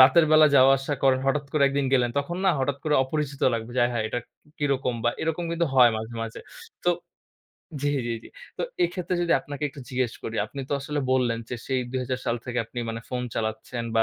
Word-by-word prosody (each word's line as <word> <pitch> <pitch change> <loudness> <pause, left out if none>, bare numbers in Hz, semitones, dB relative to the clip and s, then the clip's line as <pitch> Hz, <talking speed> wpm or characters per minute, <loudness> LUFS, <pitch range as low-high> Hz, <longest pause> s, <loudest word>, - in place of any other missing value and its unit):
রাতের 140 +5 +8
বেলা 155 0 +8
যাওয়া 135 0 +7
আসা 135 +2 -2
করেন, 130 -1 +4
হঠাৎ 145 +2 +1
করে 150 -2 +2
১ - - -4
দিন 140 - +1
গেলেন 120 -2 +3
তখন 155 +5 -2
না 190 - +6
হঠাৎ 135 +1 0
করে 150 - +2
অপরিচিত 140 0 -3
লাগবে। 115 +1 -4
যা - - +5
হ্যাঁ 115 -2 0
এটা 120 - -2
কি - - -32
কিরকম? 135 -4 0
বা 120 - +4
এরকম 160 +2 -1
কিন্তু 170 0 +1
হয় 125 -2 +8
মাঝে 110 +2 -6
মাঝে। 115 0 -6 0.4
তো 175 - +5 0.9
জি, 145 - +2 0.2
জি, 120 - -1
জি। - - -12 0.3
তো - - -2 0.2
এক্ষেত্রে 180 - -2
যদি 170 - +2
আপনাকে 145 +1 -8
একটু 140 +1 -11
জিজ্ঞেস 125 -2 -1
করি, 115 - -4
আপনি 140 - -7
তো - - -2
আসলে 145 +1 -2
বললেন 120 -3 +2
যে 120 - -3
সেই 130 -1 0
২০০০ 130 0 -2
সাল 115 - +1
থেকে 125 -1 -3
আপনি 115 +2 -8
মানে 115 0 -4
ফোন 125 -1 -2
চালাচ্ছেন, 110 +2 -3
বা 115 - +6
130 Hz, 225 wpm, -26 LUFS, 120-145 Hz, 0.9 s, রাতের